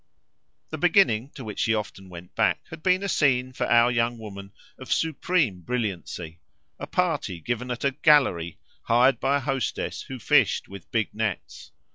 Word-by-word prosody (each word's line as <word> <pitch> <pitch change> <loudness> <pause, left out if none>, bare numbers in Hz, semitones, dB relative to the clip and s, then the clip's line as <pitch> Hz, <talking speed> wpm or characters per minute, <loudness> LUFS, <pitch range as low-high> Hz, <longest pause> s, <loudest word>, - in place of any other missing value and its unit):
The 155 - -5
beginning 160 - +3
to 135 - -8
which 105 -3 -7
she 110 - +2
often 95 -3 -6
went 90 0 -11
back - - +1
had - - -9
been 185 +2 +2
a - - -1
scene, 130 -7 +1
for - - -2
our 120 +1 +5
young 120 0 0
woman, 100 -3 -9 0.3
of 130 - -9
supreme 160 - 0
brilliancy; 90 -6 -4 0.4
a - - -6
party 160 - -1
given 120 +7 -3
at 125 -1 -4
a 140 - +3
"gallery" 130 - +3 0.3
hired 125 +3 +4
by 140 +1 +2
a - - -4
hostess 135 -2 -2
who 130 - -8
fished 115 - +2
with 100 -2 -11
big 110 -2 -1
nets. 110 -3 -4
120 Hz, 170 wpm, -25 LUFS, 100-140 Hz, 0.4 s, our